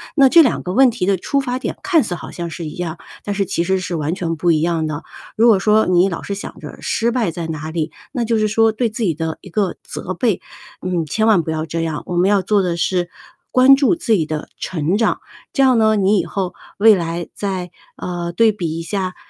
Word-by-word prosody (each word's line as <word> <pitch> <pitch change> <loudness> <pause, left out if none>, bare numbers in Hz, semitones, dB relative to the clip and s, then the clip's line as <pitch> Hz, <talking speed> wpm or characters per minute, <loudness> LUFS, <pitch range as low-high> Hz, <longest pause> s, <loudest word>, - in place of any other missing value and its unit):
那 275 -3 +6
这 335 +4 +8
2 255 - +1
个 180 - -4
问 260 +2 +5
题 205 -5 -2
的 195 -1 +3
出 280 +10 -1
发 250 -2 -2
点 260 - -4
看 345 -5 +3
似 205 - -3
好 175 - -7
像 170 -1 -5
是 165 +2 -6
一 150 - -8
样， 175 -2 -4 0.2
但 205 - -3
是 200 0 0
其 170 -2 -1
实 190 +2 +1
是 185 -1 -4
完 155 0 -1
全 170 -3 -2
不 170 +2 +2
一 155 -2 +2
样 165 -1 0
的。 155 +1 -4 0.3
如 230 +2 +4
果 220 -4 +6
说 215 +3 +3
你 180 +1 +4
老 170 - -4
是 200 - -4
想 - - -9
着 - - -9
失 230 - 0
败 230 -7 0
在 170 0 -5
哪 155 0 -5
里， 160 -1 -2 0.2
那 245 -5 -1
就 225 0 +1
是 215 0 +2
说 225 +1 +3
对 230 +1 0
自 225 +3 -7
己 175 -6 +2
的 160 +1 -4
一 - - -12
个 195 0 -1
责 185 - -5
备， 210 +2 0 0.4
嗯， 180 -3 -1
千 215 +9 0
万 210 -6 +5
不 160 - -3
要 155 0 -2
这 165 +1 -3
样， 160 -2 -3
我 175 - -3
们 180 +3 +3
要 205 -1 +3
做 200 +2 +2
的 180 -2 -1
是 175 0 0 0.4
关 260 +2 +7
注 285 +5 +3
自 330 -8 -4
己 170 -7 +2
的 155 0 -5
成 175 +1 -1
长， 225 - +1 0.3
这 275 - +3
样 260 -2 +5
呢， 220 -1 +4
你 200 0 +3
以 - - -1
后 185 -3 -3 0.3
未 220 +1 +7
来 170 -1 -3
再 185 -3 -4 0.2
呃， 175 -1 -4
对 225 +4 +4
比 170 -6 -4
一 - - -3
下， 185 +2 -3
185 Hz, 265 characters per minute, -19 LUFS, 170-220 Hz, 0.4 s, 这